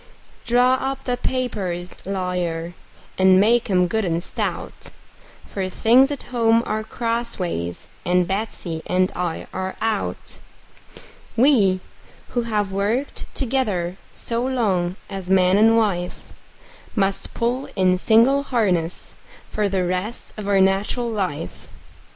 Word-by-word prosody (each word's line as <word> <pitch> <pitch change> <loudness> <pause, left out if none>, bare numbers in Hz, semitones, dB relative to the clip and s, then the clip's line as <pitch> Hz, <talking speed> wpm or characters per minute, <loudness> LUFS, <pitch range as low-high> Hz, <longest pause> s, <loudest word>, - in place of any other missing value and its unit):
Draw 250 +2 +4
up 270 0 -3
the 250 - 0
papers, 195 -10 -2
lawyer, 180 -3 -2 0.5
and 190 0 +6
make 235 +3 +3
'em 180 -2 +4
good 220 +5 0
and 170 -2 -1
stout; - - -4 0.6
For 190 -2 -3
things 245 +8 +5
at 285 -2 -4
home 230 -1 +4
are 215 0 -2
crossways, 220 - -3 0.2
and 180 0 +2
Betsey 190 -5 -3
and 185 +1 +2
I 175 -2 -2
are 190 0 -3
out. 220 -2 -2 1.0
We, 220 -8 +4 0.5
who 245 - 0
have 205 -3 0
worked 210 +8 -1
together 215 -10 0 0.2
so 235 0 -1
long 200 -9 0
as 190 -2 -6
man 185 -1 +4
and 225 +2 +5
wife, 185 -6 -1 0.6
Must 195 -2 0
pull 245 +3 -1
in 185 -2 +3
single 235 +8 +5
harness 190 -11 0 0.4
for 210 -1 0
the 190 -2 0
rest 185 +6 -3
of 210 -2 -6
our 200 -1 +3
nat'ral 195 +5 +1
life. 180 - -4
200 Hz, 125 wpm, -22 LUFS, 180-235 Hz, 1.0 s, and